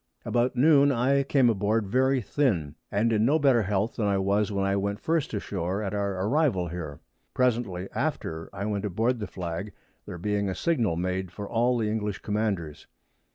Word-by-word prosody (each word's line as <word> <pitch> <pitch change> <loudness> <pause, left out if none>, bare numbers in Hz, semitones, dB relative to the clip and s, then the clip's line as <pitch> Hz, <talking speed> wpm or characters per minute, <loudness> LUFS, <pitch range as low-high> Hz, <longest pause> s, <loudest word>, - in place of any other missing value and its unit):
About 120 +1 +1
Noon 140 +1 +5
I 135 +2 +2
came 135 -2 +3
aboard 105 0 +1
very 130 +5 +2
thin, 100 - 0 0.2
and 110 +3 +1
in 110 0 +2
no 140 +7 +4
better 135 -6 +4
Health 105 +2 -1
than 105 - 0
I 100 -1 +2
was 100 +2 +1
when 100 -1 0
I 100 0 +1
went 100 +1 -1
first 160 +1 0
ashore 100 -1 -3
at 100 0 -3
our 100 -2 -1
Arrival 120 - +1
here. 80 -3 -6 0.3
Presently 115 -8 0
after 110 - -3
I 100 +1 -5
went 105 -1 -2
aboard 115 +6 0
the 105 - -4
Flag, 90 +3 -5 0.3
there - - -6
being 100 +2 -1
a 95 - -3
Signal 120 - +1
made 90 +1 -2
for 100 +3 -7
all 120 +3 +1
the 110 -2 0
English 105 -5 -3
Commanders. 100 -8 -2
105 Hz, 185 wpm, -27 LUFS, 95-120 Hz, 0.3 s, Noon